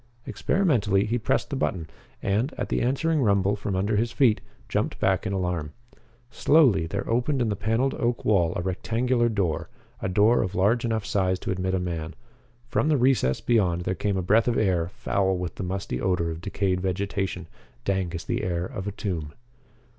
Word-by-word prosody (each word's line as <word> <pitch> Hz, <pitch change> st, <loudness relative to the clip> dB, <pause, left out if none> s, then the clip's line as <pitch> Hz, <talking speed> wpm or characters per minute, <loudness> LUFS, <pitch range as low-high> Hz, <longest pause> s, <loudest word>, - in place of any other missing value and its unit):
Experimentally 115 Hz, -, +1 dB
he 120 Hz, +3 st, -1 dB
pressed 110 Hz, -, 0 dB
the -, -, -1 dB
button, 90 Hz, -, -1 dB, 0.4 s
and, 110 Hz, +9 st, 0 dB
at -, -, -3 dB
the -, -, 0 dB
answering 150 Hz, +5 st, +1 dB
rumble 100 Hz, -3 st, +2 dB
from 100 Hz, -1 st, -3 dB
under 100 Hz, +3 st, +1 dB
his 115 Hz, +2 st, 0 dB
feet, 120 Hz, -6 st, +3 dB, 0.3 s
jumped -, -, -1 dB
back 95 Hz, +3 st, +1 dB
in -, -, -2 dB
alarm. 90 Hz, -5 st, -2 dB, 0.6 s
Slowly 125 Hz, -, +4 dB
there -, -, -4 dB
opened 125 Hz, +4 st, +1 dB
in 120 Hz, -3 st, +1 dB
the 105 Hz, -, 0 dB
paneled 115 Hz, +7 st, 0 dB
oak 120 Hz, 0 st, -1 dB
wall 90 Hz, -6 st, +3 dB
a 90 Hz, -, -2 dB
rectangular 120 Hz, +6 st, 0 dB
door, 95 Hz, -8 st, -1 dB, 0.3 s
a -, -, -1 dB
door 105 Hz, +6 st, +4 dB
of 95 Hz, +2 st, -3 dB
large 105 Hz, +5 st, +2 dB
enough 110 Hz, -3 st, -1 dB
size 95 Hz, -2 st, +1 dB
to -, -, -3 dB
admit 95 Hz, 0 st, -1 dB
a -, -, 0 dB
man. 85 Hz, -3 st, -4 dB, 0.5 s
From 145 Hz, -, +1 dB
the 150 Hz, -, +4 dB
recess 125 Hz, -, +2 dB
beyond 95 Hz, -8 st, +2 dB
there 90 Hz, -, -1 dB
came 100 Hz, +2 st, -1 dB
a 95 Hz, -, -1 dB
breath 110 Hz, +6 st, +3 dB
of 120 Hz, -, +1 dB
air, 90 Hz, -5 st, +1 dB
foul 95 Hz, 0 st, 0 dB
with 90 Hz, -2 st, -4 dB
the -, -, -6 dB
musty 90 Hz, -8 st, -3 dB
odor 90 Hz, -3 st, 0 dB
of 80 Hz, +1 st, -7 dB
decayed 95 Hz, -1 st, -1 dB
vegetation, 95 Hz, 0 st, -2 dB, 0.4 s
dank 95 Hz, -3 st, -1 dB
as 85 Hz, -, -5 dB
the -, -, -2 dB
air 85 Hz, -1 st, -1 dB
of 95 Hz, +1 st, -6 dB
a -, -, -1 dB
tomb. 85 Hz, -7 st, -4 dB
100 Hz, 190 wpm, -26 LUFS, 90-115 Hz, 0.6 s, Slowly